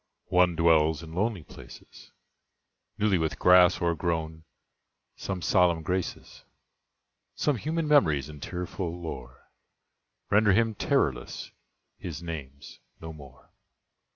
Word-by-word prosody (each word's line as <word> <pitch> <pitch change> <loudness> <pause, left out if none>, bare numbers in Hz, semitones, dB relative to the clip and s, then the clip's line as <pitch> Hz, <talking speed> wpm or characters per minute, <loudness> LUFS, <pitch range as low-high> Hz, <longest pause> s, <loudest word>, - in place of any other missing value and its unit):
One 90 -1 +4
dwells 80 -1 +3
in 80 0 -10
lonely 100 -1 -1
places, - - -14 0.9
Newly 100 -4 +2
with 80 -1 -2
grass 90 0 +5
o'ergrown; 80 -2 -2 0.7
some 95 -3 -5
solemn 90 -4 +3
graces, 90 +2 -4 0.9
Some 150 - +1
human 160 +7 -2
memories 80 - +3
and 75 -2 -11
tearful 90 0 -5
lore, 65 -7 -9 0.8
Render 105 0 +4
him 115 +2 +2
terrorless: - - -1 0.5
his 85 -2 -7
name's 70 -5 -8 0.2
"No 80 0 -8
More." 70 -4 -15
85 Hz, 105 wpm, -27 LUFS, 80-95 Hz, 0.9 s, grass